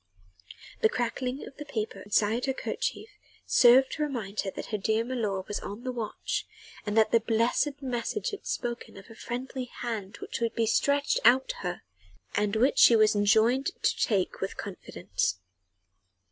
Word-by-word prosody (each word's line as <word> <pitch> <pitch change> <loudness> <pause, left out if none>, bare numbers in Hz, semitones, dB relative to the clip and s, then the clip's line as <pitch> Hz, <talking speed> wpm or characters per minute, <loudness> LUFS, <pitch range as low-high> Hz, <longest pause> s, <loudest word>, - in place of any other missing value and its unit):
The 220 - +5
crackling 250 +3 -2
of - - -13
the 295 - -6
paper 215 -7 -4
inside 210 +4 +1
her 265 - 0
kerchief - - -3 0.4
served 260 +2 +6
to - - -4
remind 230 -9 -3
her 195 - 0
that - - -7
her - - +2
dear 220 +3 +1
milor 215 -7 -2
was 205 - -3
on 205 +4 -7
the 255 - -2
watch 230 -4 -3 0.4
and 210 +1 -1
that 220 - +4
the 230 - +5
blessed 230 +6 +1
message 250 - -2
had 410 - -8
spoken 240 -4 -4
of 195 +4 -13
a - - -12
friendly 250 +2 -5
hand 225 -5 -5
which - - -5
would 230 -1 -1
be 230 - +2
stretched 280 +5 +2
out 255 +3 +5
to - - -2
her 180 -1 -4 0.5
and 205 0 0
which 250 +6 +3
she 235 - +8
was 215 -1 +5
enjoined 220 +6 +3 0.2
to - - +3
take 195 -5 0
with 195 - -3
confidence. 95 - -3
230 Hz, 175 wpm, -28 LUFS, 205-255 Hz, 0.5 s, she